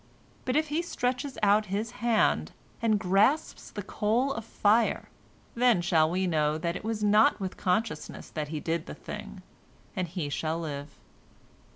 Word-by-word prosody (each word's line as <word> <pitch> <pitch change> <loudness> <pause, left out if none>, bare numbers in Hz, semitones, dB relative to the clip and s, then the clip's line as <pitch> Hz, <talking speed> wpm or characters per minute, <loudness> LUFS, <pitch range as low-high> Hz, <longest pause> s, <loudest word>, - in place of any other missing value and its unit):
But 255 - 0
if 310 0 +2
he 305 +3 +1
stretches 260 -4 -2
out 210 +1 +4
his 205 +4 -2
hand 235 -2 +2 0.3
and 220 -2 +3
grasps 205 - +2
the 205 - -6
coal 230 +8 0
of 225 - -5
fire, 220 +1 +2 0.4
then 240 -4 +4
shall 165 -3 +3
we 185 +2 0
know 155 -3 +1
that 170 +1 -2
it - - -6
was 220 -1 -2
not 210 +2 +5
with 190 -2 -4
consciousness 215 +5 -2
that 155 -2 -3
he 155 +1 -4
did 165 +2 -2
the - - -7
thing, - - -8 0.5
and 185 -3 -1
he 170 -2 -3
shall 160 +3 -2
live." 145 -3 -6
205 Hz, 165 wpm, -28 LUFS, 170-230 Hz, 0.5 s, not